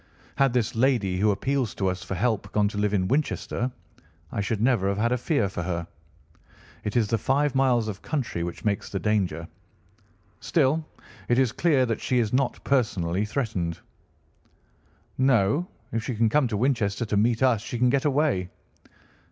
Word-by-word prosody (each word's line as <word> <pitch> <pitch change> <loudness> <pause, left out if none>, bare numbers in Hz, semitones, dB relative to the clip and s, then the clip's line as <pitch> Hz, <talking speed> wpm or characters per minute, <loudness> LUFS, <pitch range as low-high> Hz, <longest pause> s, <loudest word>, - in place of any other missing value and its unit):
Had 135 -2 +4
this 120 -2 0
lady 115 -7 +2
who 105 +2 +3
appeals 125 +4 0
to 95 - -1
us 95 0 -2
for 95 0 -4
help 105 0 -1
gone 105 -1 +2
to 100 - -7
live 105 -1 +1
in 95 -2 +1
Winchester, 130 -1 -1 0.6
I - - -2
should 100 +1 -1
never 115 -4 +2
have 100 - -1
had 115 +3 +1
a 125 - +2
fear 140 - +1
for 95 -2 -5
her. 85 -1 -3 1.0
It 105 +2 -1
is 110 -3 +3
the 115 - +1
five 140 +5 +1
miles 125 -4 +2
of 100 -3 -5
country 130 - -3
which 85 +4 -5
makes 105 0 -1
the 100 - -3
danger. 95 -6 0 0.9
Still, 155 0 +1 0.5
it 120 - +3
is 130 -3 +3
clear 145 -2 +2
that 115 -2 -2
she 125 - 0
is 115 -2 +1
not 135 0 0
personally 100 -8 +1
threatened." 105 - -2 1.4
"No. 130 - +3 0.2
If 115 -1 -2
she 125 - -3
can 110 0 +2
come 145 +2 +3
to 110 -3 -2
Winchester 120 -3 0
to 105 - -2
meet 115 +4 +2
us 120 -5 +3
she 120 - -5
can 125 +1 +3
get 140 0 +1
away." 140 - +1
115 Hz, 180 wpm, -26 LUFS, 100-130 Hz, 1.4 s, Had